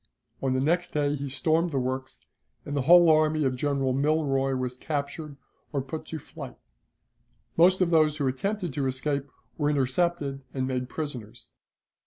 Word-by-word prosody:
On 135 -1 +1
the 130 - +1
next 170 +6 0
day 145 -1 +1
he 140 -1 -4
stormed 160 +6 +1
the 140 - -2
works, 130 +1 -3 0.4
and 145 - -4
the 140 - +1
whole 175 +5 +7
army 155 -1 +4
of 130 -2 +1
General 135 -1 0
Milroy 135 -2 +1
was 125 -1 -2
captured 145 +1 -4 0.3
or 145 - -1
put 155 +4 -6
to 160 - -4
flight. 150 - -10 1.0
Most 185 +3 +5
of 175 -1 +3
those 155 -2 +4
who 145 - -1
attempted 180 +5 -2
to 140 -1 -1
escape 140 +2 -2 0.3
were 145 -1 +2
intercepted 140 0 0
and 130 -1 0
made 125 -1 -2
prisoners. 120 -7 -6
145 Hz, 165 wpm, -27 LUFS, 130-155 Hz, 1.0 s, whole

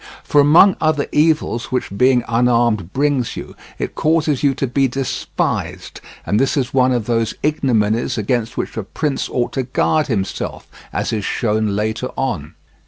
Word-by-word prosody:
For 145 - +4
among 170 +7 +6
other 155 -2 +1
evils 150 -7 +1
which 125 -6 -3
being 125 +2 +3
unarmed 115 -5 +1
brings 140 -2 0
you, - - -8 0.2
it - - -4
causes 155 -3 +1
you 140 -2 +2
to 135 - -1
be 135 +2 +1
despised, 130 +1 -3 0.2
and 105 - +1
this 135 +3 +1
is 130 -3 -1
one 130 -1 +3
of 120 -4 0
those 115 -1 0
ignominies 120 -7 +1
against 115 +1 -1
which - - -3
a - - 0
prince 145 +7 -2
ought 120 -1 -1
to 135 - 0
guard 145 +4 +1
himself, 100 -7 -3 0.3
as - - -2
is 105 -2 -2
shown 110 -1 0
later 110 +4 -2
on. 90 - -3
125 Hz, 165 wpm, -19 LUFS, 110-140 Hz, 0.3 s, among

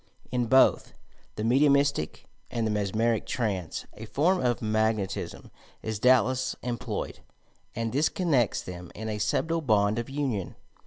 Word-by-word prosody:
In 125 -2 0
both 130 +3 +4 0.4
the 105 - -3
mediumistie 140 - +2 0.2
and 115 -3 -1
the 110 - 0
mesmeric 110 +2 0
trance 100 -8 -2
a 110 - -9
form 160 - +2
of 120 -2 +1
"magnetism" 110 -2 -1 0.3
is 110 -2 -3
doubtless 130 +1 +3
employed, 120 -3 -4 0.6
and 115 0 -2
this 145 +4 +3
connects 145 - +1
them 90 -1 -8
in 110 +1 -5
a 105 -1 -3
subtle 160 +11 0
bond 110 -4 +2
of 120 - -5
union. 135 - -2
115 Hz, 140 wpm, -27 LUFS, 105-130 Hz, 0.6 s, both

